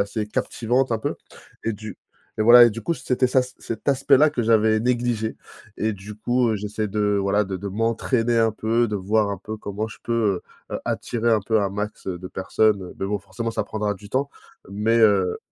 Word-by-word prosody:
assez 105 Hz, +1 st, -2 dB
captivante 120 Hz, +4 st, -1 dB
un 115 Hz, -, +1 dB
peu? -, -, -2 dB, 0.5 s
Et 115 Hz, -, 0 dB
du 105 Hz, -1 st, -8 dB, 0.4 s
et -, -, +3 dB
voilà, 120 Hz, +2 st, +9 dB
et 120 Hz, -, +4 dB
du 115 Hz, +2 st, -7 dB
coup 170 Hz, -, 0 dB
c'était 130 Hz, -4 st, 0 dB
ça 130 Hz, -, +4 dB
c 125 Hz, -, -10 dB
cet 115 Hz, +4 st, -6 dB
aspect 135 Hz, 0 st, +4 dB
là 155 Hz, +1 st, +6 dB
que 130 Hz, -5 st, -2 dB
j'avais 110 Hz, -1 st, +3 dB
négligé 120 Hz, -2 st, -1 dB, 0.4 s
et 110 Hz, +1 st, 0 dB
du 100 Hz, +2 st, -10 dB
coup, 120 Hz, +3 st, +1 dB
heu, -, -, +1 dB
j'essaie 105 Hz, +1 st, -3 dB
de 105 Hz, 0 st, +1 dB
voilà 100 Hz, +2 st, +2 dB
de 95 Hz, -1 st, -4 dB
de 100 Hz, -, -7 dB
m'entraîner 115 Hz, +3 st, 0 dB
un 115 Hz, -1 st, +3 dB
peu, 115 Hz, +2 st, +1 dB
de 105 Hz, -, -3 dB
voir 100 Hz, +2 st, +1 dB
un 100 Hz, -, -4 dB
peu 110 Hz, +3 st, -7 dB
comment 105 Hz, +2 st, -4 dB
je -, -, -11 dB
peux, 110 Hz, -6 st, 0 dB, 0.3 s
heu, -, -, -2 dB
attirer 120 Hz, 0 st, -1 dB
un 110 Hz, -, +3 dB
peu 110 Hz, +3 st, +1 dB
un 100 Hz, -1 st, 0 dB
max, 105 Hz, +1 st, -5 dB
heu, 90 Hz, -2 st, -3 dB
de 90 Hz, -, -8 dB
personnes 95 Hz, 0 st, 0 dB
mais 95 Hz, -, -2 dB
bon 105 Hz, 0 st, -1 dB
forcément 115 Hz, +3 st, -5 dB
ça -, -, -1 dB
prendra 105 Hz, -1 st, -2 dB
du 100 Hz, +1 st, -14 dB
temps 135 Hz, +4 st, 0 dB, 0.4 s
mais, 110 Hz, +3 st, +1 dB
heu 100 Hz, -5 st, +3 dB
110 Hz, 220 wpm, -23 LUFS, 100-115 Hz, 0.5 s, voilà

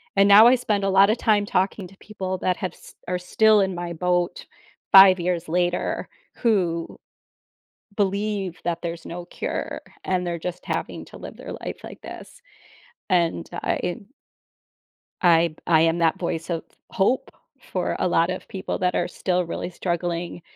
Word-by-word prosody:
And 195 Hz, 0 st, +5 dB
now 205 Hz, +3 st, +9 dB
I 250 Hz, -, +6 dB
spend 210 Hz, -5 st, -1 dB
a 195 Hz, -, +1 dB
lotta 195 Hz, +3 st, +5 dB
time 210 Hz, -3 st, +2 dB
talking 190 Hz, 0 st, -1 dB
to 195 Hz, -, -19 dB
people 190 Hz, -3 st, -5 dB
that 180 Hz, 0 st, 0 dB
have 185 Hz, -, -4 dB
s -, -, -16 dB
are 180 Hz, 0 st, -1 dB
still 215 Hz, +3 st, +4 dB
in 190 Hz, -1 st, 0 dB
my 175 Hz, 0 st, -4 dB
boat 175 Hz, +1 st, -1 dB, 0.5 s
5 190 Hz, -2 st, +9 dB
years 175 Hz, -1 st, -1 dB
later, 175 Hz, +1 st, -1 dB, 0.3 s
who 180 Hz, -8 st, 0 dB, 1.0 s
believe 200 Hz, -2 st, -1 dB
that 170 Hz, 0 st, -2 dB
there's 170 Hz, -1 st, -5 dB
no 175 Hz, +1 st, -7 dB
cure -, -, -4 dB, 0.2 s
and 185 Hz, -1 st, -1 dB
they're 170 Hz, -1 st, -3 dB
just 180 Hz, +2 st, -6 dB
having -, -, -3 dB
to -, -, -13 dB
live -, -, -9 dB
their -, -, -8 dB
life -, -, -7 dB
like -, -, -10 dB
this. -, -, -11 dB, 0.7 s
And 170 Hz, -3 st, +1 dB
I 175 Hz, -, -3 dB
i 175 Hz, -, -2 dB, 1.3 s
I 170 Hz, -2 st, +4 dB
I 160 Hz, -2 st, +5 dB
am 165 Hz, +1 st, +2 dB
that 165 Hz, -1 st, +2 dB
voice 165 Hz, -1 st, -3 dB
of 165 Hz, -2 st, -2 dB, 0.3 s
hope 220 Hz, +7 st, +1 dB, 0.3 s
for -, -, -3 dB
a -, -, +1 dB
lot 170 Hz, 0 st, +2 dB
of 185 Hz, -, -6 dB
people 190 Hz, -, -4 dB
that 180 Hz, -1 st, +1 dB
are 175 Hz, -, +1 dB
still 180 Hz, -1 st, -1 dB
really 170 Hz, -, -4 dB
struggling, 175 Hz, -1 st, -3 dB
180 Hz, 165 wpm, -24 LUFS, 170-195 Hz, 1.3 s, now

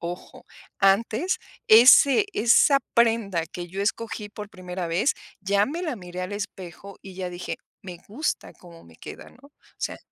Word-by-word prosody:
ojo, 175 Hz, +1 st, -8 dB, 0.3 s
antes 220 Hz, -, +2 dB, 0.3 s
ese 255 Hz, -, +7 dB
esa 235 Hz, +5 st, +4 dB, 0.2 s
prenda 225 Hz, -8 st, +1 dB
que 175 Hz, +1 st, -8 dB
yo 195 Hz, +3 st, -4 dB
escogí 215 Hz, 0 st, -3 dB
por 210 Hz, 0 st, -9 dB
primera 180 Hz, -2 st, -6 dB
vez, 175 Hz, -, +1 dB, 0.3 s
ya 200 Hz, +1 st, +2 dB
me 335 Hz, +6 st, -5 dB
la 310 Hz, -7 st, -2 dB
miré 180 Hz, -1 st, -7 dB
al 185 Hz, +3 st, -5 dB
espejo 195 Hz, -1 st, -8 dB
y 190 Hz, -1 st, -11 dB
ya 180 Hz, -1 st, -5 dB
dije, 175 Hz, 0 st, -6 dB, 0.3 s
me 180 Hz, -3 st, -9 dB
gusta 290 Hz, +9 st, -3 dB
cómo 170 Hz, -2 st, -16 dB
me 80 Hz, -1 st, -18 dB
queda, -, -, -11 dB
¿no? 280 Hz, +3 st, -19 dB
O -, -, -41 dB, 0.3 s
sea -, -, -4 dB
200 Hz, 165 wpm, -24 LUFS, 180-230 Hz, 0.3 s, ese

